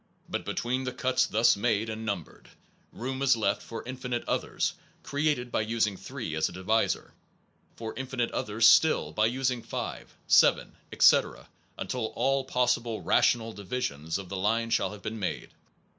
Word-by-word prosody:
But -, -, -4 dB
between 130 Hz, +2 st, -2 dB
the 130 Hz, -, -3 dB
cuts 130 Hz, -1 st, +1 dB
thus 115 Hz, +2 st, +4 dB
made 110 Hz, +1 st, 0 dB
and 110 Hz, 0 st, -5 dB
numbered, 100 Hz, -7 st, -5 dB, 0.4 s
room 130 Hz, +3 st, -5 dB
is 130 Hz, -4 st, +4 dB
left 105 Hz, -2 st, 0 dB
for 115 Hz, -, -8 dB
infinite 125 Hz, -1 st, -4 dB
others -, -, -1 dB, 0.3 s
created 145 Hz, -4 st, -1 dB
by -, -, +1 dB
using 110 Hz, -2 st, 0 dB
3 115 Hz, -, -6 dB
as 80 Hz, 0 st, +1 dB
a -, -, -10 dB
divisor, 95 Hz, +5 st, 0 dB, 0.6 s
for 110 Hz, -1 st, -6 dB
infinite 130 Hz, -2 st, -2 dB
others 110 Hz, +2 st, +2 dB
still 160 Hz, +6 st, +5 dB
by 110 Hz, +1 st, +2 dB
using 125 Hz, 0 st, -1 dB
5, -, -, -6 dB
7, -, -, +4 dB, 0.2 s
etc., -, -, +4 dB, 0.3 s
until -, -, -3 dB
all 135 Hz, +2 st, +1 dB
possible 120 Hz, -3 st, 0 dB
rational 115 Hz, -1 st, +2 dB
divisions 90 Hz, -, -3 dB
of 100 Hz, -2 st, -7 dB
the 95 Hz, -, -5 dB
line 115 Hz, +4 st, 0 dB
shall -, -, +1 dB
have 105 Hz, -1 st, -11 dB
been 110 Hz, +1 st, -4 dB
made. 95 Hz, -, -4 dB
115 Hz, 160 wpm, -28 LUFS, 105-125 Hz, 0.6 s, still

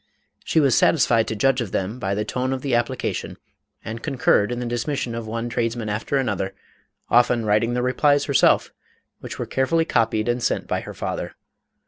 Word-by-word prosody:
She -, -, +2 dB
was 140 Hz, -5 st, +4 dB
satisfied 120 Hz, -7 st, +3 dB
to 110 Hz, -, -3 dB
judge 130 Hz, +4 st, +2 dB
of 110 Hz, -6 st, -4 dB
them 100 Hz, +6 st, -2 dB
by 95 Hz, -2 st, -1 dB
the 105 Hz, +1 st, -2 dB
tone 130 Hz, +1 st, -2 dB
of 130 Hz, -, -5 dB
the 140 Hz, -3 st, -1 dB
application, 120 Hz, +2 st, -2 dB, 0.5 s
and 115 Hz, +1 st, -5 dB
concurred 120 Hz, -5 st, +2 dB
in 120 Hz, -, -3 dB
the 125 Hz, -, -3 dB
dismission 120 Hz, +1 st, -2 dB
of 115 Hz, -1 st, -5 dB
one 115 Hz, +2 st, -3 dB
tradesman 115 Hz, -1 st, -2 dB
after 110 Hz, +7 st, -1 dB
another, 100 Hz, -7 st, -2 dB, 0.6 s
often 120 Hz, -1 st, +4 dB
writing 110 Hz, +3 st, +2 dB
the 125 Hz, -, 0 dB
replies 145 Hz, +3 st, +2 dB
herself, -, -, +3 dB, 0.5 s
which -, -, -8 dB
were -, -, -3 dB
carefully 160 Hz, +5 st, +1 dB
copied 110 Hz, -4 st, +1 dB
and 120 Hz, +1 st, 0 dB
sent -, -, 0 dB
by -, -, -2 dB
her -, -, -9 dB
father. -, -, -4 dB
120 Hz, 185 wpm, -23 LUFS, 110-130 Hz, 0.6 s, was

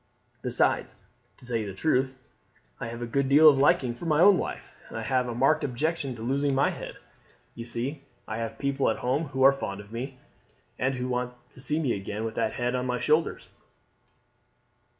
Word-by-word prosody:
Besides, -, -, +1 dB, 0.4 s
to -, -, -16 dB
tell 120 Hz, -1 st, -1 dB
you 110 Hz, -2 st, -3 dB
the 95 Hz, -, -7 dB
truth, 130 Hz, +1 st, +1 dB, 0.6 s
I -, -, -4 dB
have 115 Hz, +1 st, -6 dB
a -, -, -1 dB
good 135 Hz, +3 st, 0 dB
deal 150 Hz, +3 st, +8 dB
of 140 Hz, -3 st, +7 dB
liking 130 Hz, -3 st, +3 dB
for 165 Hz, +8 st, -7 dB
my 155 Hz, -1 st, +3 dB
own 200 Hz, +3 st, +8 dB
life, -, -, -4 dB, 0.2 s
and -, -, -7 dB
have 125 Hz, +2 st, 0 dB
a 120 Hz, -, -4 dB
marked 135 Hz, +5 st, +3 dB
objection 140 Hz, +1 st, -1 dB
to 110 Hz, -, -8 dB
losing 140 Hz, +3 st, +1 dB
my 135 Hz, -, +3 dB
head. -, -, -8 dB, 0.6 s
You 115 Hz, -, -7 dB
see 125 Hz, +5 st, -3 dB, 0.3 s
I 110 Hz, -, -4 dB
have 115 Hz, -1 st, -4 dB
people 140 Hz, 0 st, +1 dB
at 110 Hz, -, 0 dB
home 135 Hz, +6 st, +1 dB
who 135 Hz, -2 st, -1 dB
are 135 Hz, +1 st, +8 dB
fond 100 Hz, -7 st, -5 dB
of 100 Hz, +1 st, -12 dB
me, 130 Hz, +3 st, -5 dB, 0.6 s
and 130 Hz, +1 st, +1 dB
who 125 Hz, 0 st, -3 dB
want 125 Hz, 0 st, -2 dB, 0.2 s
to 125 Hz, -, -12 dB
see 150 Hz, +4 st, -1 dB
me 140 Hz, -6 st, 0 dB
back 100 Hz, -, -4 dB
again 105 Hz, +3 st, -4 dB
with 110 Hz, -, -3 dB
that 110 Hz, -, -1 dB
head 120 Hz, 0 st, -1 dB
on 125 Hz, 0 st, -1 dB
my 125 Hz, 0 st, 0 dB
shoulders." 155 Hz, +2 st, +1 dB
130 Hz, 210 wpm, -27 LUFS, 120-140 Hz, 0.6 s, deal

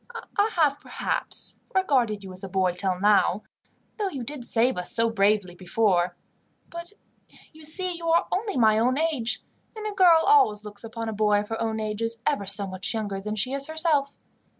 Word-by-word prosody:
"I 410 Hz, +1 st, +2 dB
have, 295 Hz, -4 st, +2 dB
perhaps, -, -, 0 dB, 0.2 s
regarded 250 Hz, -, +1 dB
you 190 Hz, -, -9 dB
as 185 Hz, +2 st, -7 dB
a 195 Hz, -, -6 dB
boy 185 Hz, -1 st, +1 dB
till 180 Hz, 0 st, -2 dB
now, 210 Hz, +1 st, +3 dB, 0.6 s
though 405 Hz, -2 st, 0 dB
you 275 Hz, -8 st, -6 dB
did 275 Hz, +1 st, -7 dB
save 245 Hz, +3 st, +2 dB
us 180 Hz, 0 st, -1 dB
so 230 Hz, 0 st, +2 dB
bravely 200 Hz, -3 st, +1 dB
before; 180 Hz, 0 st, 0 dB, 0.6 s
but 340 Hz, +3 st, -8 dB, 0.6 s
you 315 Hz, 0 st, -15 dB
see 360 Hz, +3 st, +1 dB
you 335 Hz, 0 st, -6 dB
are 335 Hz, +1 st, +3 dB
only 405 Hz, -3 st, -2 dB
my 220 Hz, -2 st, +4 dB
own 250 Hz, +4 st, +1 dB
age, 300 Hz, -7 st, -1 dB, 0.3 s
and 430 Hz, -, -6 dB
a 425 Hz, -, -2 dB
girl 345 Hz, -4 st, +5 dB
always 305 Hz, -, +4 dB
looks 205 Hz, +1 st, -8 dB
upon 225 Hz, 0 st, -6 dB
a 220 Hz, -, -3 dB
boy 210 Hz, -1 st, +2 dB
of 210 Hz, -, -10 dB
her 225 Hz, 0 st, -4 dB
own 220 Hz, -1 st, -2 dB
age 215 Hz, 0 st, -4 dB
as 230 Hz, 0 st, -2 dB
ever 240 Hz, -10 st, 0 dB
so 200 Hz, +1 st, +2 dB
much 190 Hz, +3 st, -4 dB
younger 205 Hz, -3 st, -3 dB
than 210 Hz, +2 st, -4 dB
she 255 Hz, +5 st, -1 dB
is 275 Hz, 0 st, -1 dB
herself. 315 Hz, -3 st, 0 dB
225 Hz, 195 wpm, -25 LUFS, 205-310 Hz, 0.6 s, girl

